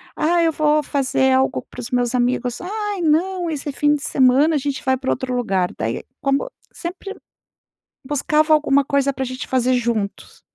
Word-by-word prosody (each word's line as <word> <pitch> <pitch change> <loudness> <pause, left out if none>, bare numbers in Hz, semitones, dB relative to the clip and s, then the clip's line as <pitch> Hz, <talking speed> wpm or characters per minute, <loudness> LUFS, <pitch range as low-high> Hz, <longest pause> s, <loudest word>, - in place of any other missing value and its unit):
Ah, 340 +2 +2
eu 325 - +3
vou 300 0 +2
fazer 265 -2 +1
algo 265 +1 +1
para - - -11
os 230 - -7
meus 245 -1 0
amigos". 245 0 0
"Ai, 415 0 -3
não, 345 +2 +1
esse 290 -2 -4
fim 295 +2 +2
de 290 - -5
semana 275 +4 +3
a - - +3
gente 280 -1 -3
vai 260 0 +3
pra 260 0 -4
outro 255 -1 -2
lugar". 195 -7 0
Daí 115 +1 -3 0.2
como 275 - 0 0.2
sempre, 370 +3 -7 0.9
buscava 300 +3 +2
alguma 280 -2 +3
coisa 280 0 +1
pra 265 - -3
a - - -2
gente 255 0 -6
fazer 255 0 +1
juntos. 230 -5 -2
275 Hz, 180 wpm, -20 LUFS, 255-310 Hz, 0.9 s, eu